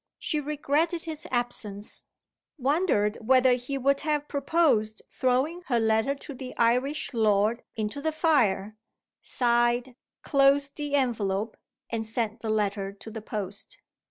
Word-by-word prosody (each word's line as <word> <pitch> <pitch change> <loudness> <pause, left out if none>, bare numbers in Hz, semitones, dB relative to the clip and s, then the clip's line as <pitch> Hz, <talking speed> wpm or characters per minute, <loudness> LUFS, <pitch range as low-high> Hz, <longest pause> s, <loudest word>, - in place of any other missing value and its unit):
She 305 - -1
regretted 300 +3 0
his 315 -2 -5
absence 215 -4 -3 0.5
wondered 265 - +1
whether 255 +2 +5
he 250 +3 -2
would 275 +1 +2
have 295 -1 -1
proposed 280 -7 +1
throwing 265 +7 0
her 240 -3 +2
letter 220 +4 +2
to 285 +1 -9
the 255 -1 -8
Irish 250 +6 +1
lord 220 0 +2
into 220 +6 -3
the 315 +2 0
fire 230 - +2 0.4
sighed, 240 +1 +1 0.3
closed 275 0 +3
the 290 -1 -2
envelope, 220 -5 0 0.4
and 225 -1 -1
sent 225 0 -2
the 225 - -3
letter 200 -2 0
to 210 +2 -11
the 220 0 -6
post. 205 -2 -6
245 Hz, 130 wpm, -27 LUFS, 220-285 Hz, 0.5 s, whether